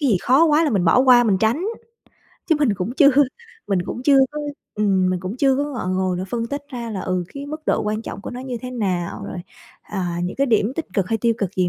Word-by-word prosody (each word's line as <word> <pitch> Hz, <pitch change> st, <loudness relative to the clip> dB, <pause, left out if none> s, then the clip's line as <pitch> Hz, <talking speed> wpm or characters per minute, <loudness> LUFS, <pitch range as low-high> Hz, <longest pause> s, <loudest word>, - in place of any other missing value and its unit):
cái 285 Hz, -, +2 dB
gì 195 Hz, -, +4 dB
khó 265 Hz, +6 st, +5 dB
quá 315 Hz, 0 st, +4 dB
là 300 Hz, -, +1 dB
mình 195 Hz, -5 st, +1 dB
bỏ 165 Hz, -, +4 dB
qua, 250 Hz, -2 st, +6 dB
mình 200 Hz, -4 st, +2 dB
tránh, 235 Hz, -, +1 dB, 0.8 s
chứ 320 Hz, -, +3 dB
mình 250 Hz, -9 st, +2 dB
cũng 200 Hz, +5 st, -3 dB
chưa 285 Hz, -1 st, +6 dB, 0.6 s
mình 195 Hz, -2 st, +1 dB
cũng 245 Hz, -, -5 dB
chưa 275 Hz, 0 st, +5 dB
có 300 Hz, -, -4 dB, 0.3 s
ừm, 195 Hz, -3 st, +2 dB
mình 180 Hz, -1 st, -2 dB
cũng 190 Hz, +6 st, -5 dB
chưa 270 Hz, 0 st, +3 dB
có 285 Hz, -, 0 dB
ngọ 260 Hz, -10 st, -5 dB
ngồi 185 Hz, -1 st, 0 dB
mà 185 Hz, -, -3 dB
phân 230 Hz, -1 st, -2 dB
tích 285 Hz, +3 st, -4 dB
ra 240 Hz, -4 st, -6 dB
là, 195 Hz, -, -4 dB
ừ, 185 Hz, -1 st, -2 dB
cái 280 Hz, 0 st, -6 dB
mức 310 Hz, +2 st, -6 dB
độ -, -, +1 dB
quan 215 Hz, +1 st, -2 dB
trọng 200 Hz, -, -7 dB
của -, -, -7 dB
nó 245 Hz, +1 st, -7 dB
như 255 Hz, -2 st, -5 dB
thế 250 Hz, -, -5 dB
nào, 185 Hz, -8 st, -2 dB
rồi, 185 Hz, -, -6 dB, 0.4 s
à, 180 Hz, -4 st, -4 dB
những 180 Hz, -, -4 dB
cái 275 Hz, +1 st, +2 dB
điểm 220 Hz, 0 st, +2 dB
tích 330 Hz, -, -3 dB
cực 195 Hz, -1 st, 0 dB
hay 225 Hz, -1 st, 0 dB
tiêu 230 Hz, +1 st, +2 dB
cực 200 Hz, -1 st, -3 dB
gì 180 Hz, -1 st, +2 dB
230 Hz, 265 wpm, -21 LUFS, 190-270 Hz, 0.8 s, qua